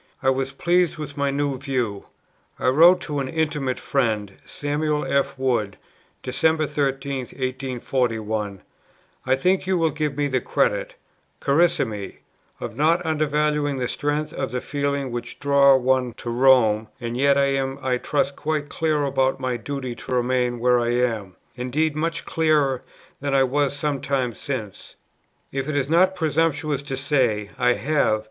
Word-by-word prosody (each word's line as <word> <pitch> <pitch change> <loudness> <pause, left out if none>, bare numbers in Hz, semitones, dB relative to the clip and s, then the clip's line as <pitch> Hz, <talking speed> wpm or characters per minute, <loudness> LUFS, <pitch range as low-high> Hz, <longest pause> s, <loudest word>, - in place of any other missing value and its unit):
I 135 - +4
was 135 0 -1
pleased 175 +4 +1
with 150 -2 -6
my 140 -1 0
new 140 -1 -1
view. 125 -7 -2 0.5
I - - +1
wrote 170 +7 +6
to 150 -4 -3
an 135 -1 -3
intimate 150 -5 -1
friend, 110 -7 -1
Samuel 150 +1 -1
F. 140 0 0
Wood, 120 -7 0 0.5
Dec. 155 +4 +1
13, 140 -1 -1
1841: 125 -6 -2 0.7
"I 130 - +4
think 185 +7 +1
you 190 -1 +2
will 165 -2 +2
give 150 -1 -2
me 145 0 +1
the 130 -2 0
credit, - - 0 0.4
Carissime, 140 - +1 0.4
of - - -6
not 165 +5 +2
undervaluing 150 -2 0
the 125 -1 -1
strength 150 +3 -2
of 135 -1 -3
the 125 - -2
feelings 140 -1 -2
which 120 0 -6
draw 140 -1 +5
one 130 -1 +1
[to 120 - -6
Rome], 120 -4 +4
and 120 -1 -4
yet 140 +2 +3
I 140 0 +3
am 135 0 -1
(I 130 -1 +1
trust) 140 0 0
quite 150 -1 -2
clear 155 -2 0
about 135 -1 +1
my 130 -1 -1
duty 130 +1 -4
to 125 - -7
remain 125 0 +1
where 125 +1 +3
I 120 0 0
am; 110 -7 -1 0.2
indeed, 145 +5 -1
much 165 +2 -2
clearer 150 -5 +2 0.4
than 140 0 -1
I 135 - +5
was 140 +1 +1
some 145 -2 -2
time 130 -3 -1
since. 110 -6 -6 0.6
If 135 +2 -3
it 150 - -2
is 140 -1 0
not 185 +3 +4
presumptuous 155 -3 0
to 140 -2 -5
say, 125 -8 +1
I 125 -1 +4
have 140 -6 +1
135 Hz, 160 wpm, -23 LUFS, 125-150 Hz, 0.7 s, wrote